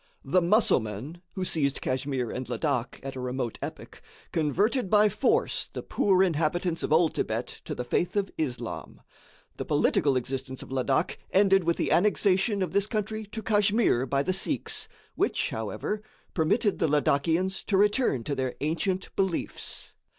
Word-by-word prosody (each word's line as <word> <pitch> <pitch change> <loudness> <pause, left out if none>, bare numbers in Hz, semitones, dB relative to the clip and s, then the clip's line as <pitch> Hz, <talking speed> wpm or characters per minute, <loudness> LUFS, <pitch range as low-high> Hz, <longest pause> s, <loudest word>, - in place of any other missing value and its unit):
The 165 +7 +3
Musselmen, 160 - +1
who 190 -2 -3
seized 140 -6 0
Kachmyr 130 -2 -2
and 130 0 -5
Ladak 130 -6 -1
at 135 0 -6
a - - -5
remote 125 -2 -3
epoch, - - -7 0.3
converted 195 - +1
by 210 +1 +5
force 275 - +1
the - - -6
poor 190 -2 +3
inhabitants 165 0 0
of - - -2
old 160 +1 +4
Thibet 110 +3 -3
to - - -4
the 125 - -3
faith 170 +10 -1
of 200 -1 0
Islam. 120 - -4 0.6
The - - -4
political 140 -3 +2
existence 130 +1 -4
of - - -13
Ladak 130 0 0
ended 195 -2 +4
with 170 0 +1
the - - -1
annexation 200 +1 +3
of 185 - -3
this 200 0 +2
country 215 0 -3
to 220 +2 -7
Kachmyr 205 - +2
by 140 0 +1
the 185 - 0
sëiks, 190 +1 0 0.3
which, - - 0
however, 210 0 -3 0.3
permitted 200 +6 +1
the 165 - +2
Ladakians 160 +6 +1
to 195 - +1
return 205 - +2
to 140 - -3
their 130 -2 -2
ancient 180 +5 -2
beliefs. 190 -3 -3
170 Hz, 160 wpm, -27 LUFS, 135-200 Hz, 0.6 s, by